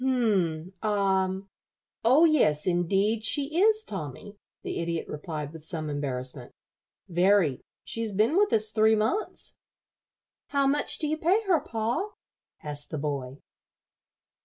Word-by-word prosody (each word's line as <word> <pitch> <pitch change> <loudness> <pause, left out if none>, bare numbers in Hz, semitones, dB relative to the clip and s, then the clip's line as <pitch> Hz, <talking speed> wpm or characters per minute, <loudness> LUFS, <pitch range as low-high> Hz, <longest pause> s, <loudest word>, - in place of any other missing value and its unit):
"H'm 195 -10 +1
ah 195 -3 +2 0.7
oh 265 +9 +6
yes, 240 - +3
indeed, 195 +5 +1
she 290 +7 +1
is, 435 +1 +4
Tommy," 190 - -7 0.3
the - - -3
Idiot 170 -1 -2
replied, 150 -1 -5
with 160 -2 -10
some 155 -1 -5
embarrassment. 130 -3 -4 0.5
"Very; 180 -5 +3 0.2
she's 225 -1 -4
been 215 - +2
with 410 +2 +3
us 215 -1 +3
three 220 0 +4
months." 225 - -2 0.9
"How 280 -1 +1
much 290 +2 +1
do 305 - -2
you 310 +1 -1
pay 375 +8 +2
her, 370 -6 +3
pa?" 245 - -2 0.5
asked 145 -1 -5
the 155 - -4
boy. 140 -3 -3
205 Hz, 130 wpm, -27 LUFS, -, 0.9 s, oh